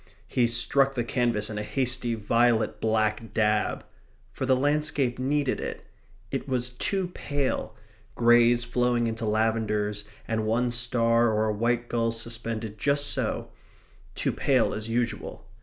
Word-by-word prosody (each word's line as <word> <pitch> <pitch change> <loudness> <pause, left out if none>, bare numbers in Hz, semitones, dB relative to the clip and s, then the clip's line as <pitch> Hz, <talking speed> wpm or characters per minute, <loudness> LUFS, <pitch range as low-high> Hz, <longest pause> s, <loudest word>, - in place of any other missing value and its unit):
He 120 -2 +2
struck 135 +4 +3
the 120 - 0
canvas 115 -3 0
a 105 0 -3
hasty 125 0 -1
violet 115 +1 +1
black 110 0 0
dab. 105 -2 +1 0.5
For 130 - -4
the 130 - +4
landscape 145 -2 +1
needed 140 +1 0
it. - - -6 0.5
It 135 - -4
was 125 -1 0
too 185 +9 -2
pale 140 -6 -2 0.4
greys 120 0 +4
flowing 120 0 +1
into 115 0 -2
lavenders, 105 -1 0 0.2
and 110 -1 -1
one 120 +2 +1
star 120 0 +2
or 110 0 +1
a 110 - 0
white 120 +2 0
gull 115 -1 0
suspended 115 -2 -3
just 145 0 +1
so - - -2 0.6
too - - -1
pale 130 -4 +1
as 110 +1 -5
usual. 120 +1 -3
120 Hz, 140 wpm, -26 LUFS, 110-125 Hz, 0.6 s, the